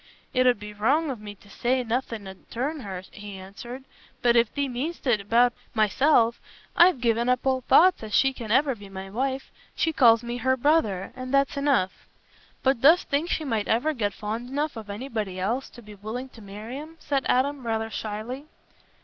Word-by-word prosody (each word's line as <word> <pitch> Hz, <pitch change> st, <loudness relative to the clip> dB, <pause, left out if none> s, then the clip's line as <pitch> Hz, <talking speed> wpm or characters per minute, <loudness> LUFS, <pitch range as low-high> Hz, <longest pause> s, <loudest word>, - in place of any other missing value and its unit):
"It 255 Hz, -1 st, +3 dB
'ud 245 Hz, -4 st, +3 dB
be 210 Hz, 0 st, -8 dB
wrong 275 Hz, +9 st, +1 dB
of 240 Hz, -5 st, -7 dB
me 205 Hz, -1 st, -8 dB
to 205 Hz, -, -21 dB
say 250 Hz, +5 st, 0 dB
nothing 230 Hz, -3 st, -3 dB
'ud 190 Hz, 0 st, -12 dB
turn 285 Hz, +6 st, -2 dB
her," 190 Hz, -6 st, -6 dB
he 205 Hz, -2 st, -9 dB
answered. 235 Hz, +7 st, -9 dB, 0.4 s
"But 240 Hz, -1 st, +4 dB
if 235 Hz, -2 st, +4 dB
thee 285 Hz, -1 st, -1 dB
mean'st 275 Hz, +8 st, -4 dB
it 230 Hz, -6 st, +2 dB
about 235 Hz, +4 st, +3 dB, 0.2 s
myself, 230 Hz, +2 st, +3 dB, 0.3 s
I've 345 Hz, -5 st, +6 dB
given 235 Hz, 0 st, +2 dB
up 250 Hz, +1 st, +1 dB
all 260 Hz, -1 st, +2 dB
thoughts 360 Hz, +8 st, +5 dB
as 220 Hz, -1 st, -7 dB
she 270 Hz, +5 st, +3 dB
can 235 Hz, -4 st, -8 dB
ever 270 Hz, +4 st, +3 dB
be 205 Hz, -4 st, -12 dB
my 195 Hz, 0 st, -8 dB
wife. 265 Hz, +4 st, -2 dB, 0.2 s
She 320 Hz, -, +1 dB
calls 230 Hz, -5 st, +5 dB
me 240 Hz, +1 st, -4 dB
her 260 Hz, +2 st, +1 dB
brother, 235 Hz, -, +1 dB
and 255 Hz, 0 st, -6 dB
that's 275 Hz, 0 st, +2 dB
enough." 280 Hz, -10 st, 0 dB, 0.6 s
"But 265 Hz, -3 st, +2 dB
dost 320 Hz, +6 st, +5 dB
think 300 Hz, +4 st, 0 dB
she 315 Hz, -, -1 dB
might 225 Hz, -6 st, -1 dB
ever 275 Hz, +8 st, +1 dB
get 210 Hz, -7 st, -1 dB
fond 225 Hz, +4 st, -5 dB
enough 290 Hz, +2 st, -2 dB
of 220 Hz, -2 st, -8 dB
anybody 210 Hz, -4 st, -4 dB
else 235 Hz, +8 st, -1 dB
to 240 Hz, -, -14 dB
be 210 Hz, 0 st, -12 dB
willing 220 Hz, +6 st, -6 dB
to 230 Hz, -, -15 dB
marry 210 Hz, +6 st, -7 dB
'em?" 315 Hz, +2 st, -10 dB
said 275 Hz, -2 st, -1 dB
Adam 275 Hz, +1 st, +1 dB
rather 225 Hz, -1 st, -2 dB
shyly. 225 Hz, +8 st, -5 dB
240 Hz, 200 wpm, -26 LUFS, 215-270 Hz, 0.6 s, I've